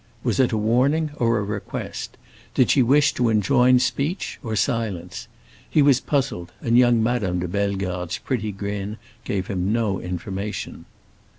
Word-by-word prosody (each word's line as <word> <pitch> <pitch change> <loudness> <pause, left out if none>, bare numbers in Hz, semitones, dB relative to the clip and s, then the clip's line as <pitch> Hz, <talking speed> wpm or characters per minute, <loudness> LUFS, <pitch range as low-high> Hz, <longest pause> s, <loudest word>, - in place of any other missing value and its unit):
Was - - 0
it 130 - +3
a 110 - 0
warning 135 +9 +2
or 115 -1 +2
a 105 - -1
request? 100 0 -5 0.4
Did 130 - +4
she 135 - +4
wish 140 +4 +4
to 120 -2 +1
enjoin 125 +4 +4
speech 135 - -1
or 110 -2 -3
silence? 105 -3 -2 0.4
He 150 - +4
was 140 -3 +5
puzzled, 130 - -2
and 115 0 +1
young 120 -2 +5
Madame 110 -6 0
de 90 0 -2
Bellegarde's 95 -2 -2
pretty 110 -5 -2
grin 100 +1 -4 0.3
gave 95 -2 -2
him 95 0 -1
no 110 -4 0
information. 95 +3 -5
110 Hz, 155 wpm, -23 LUFS, 100-125 Hz, 0.4 s, was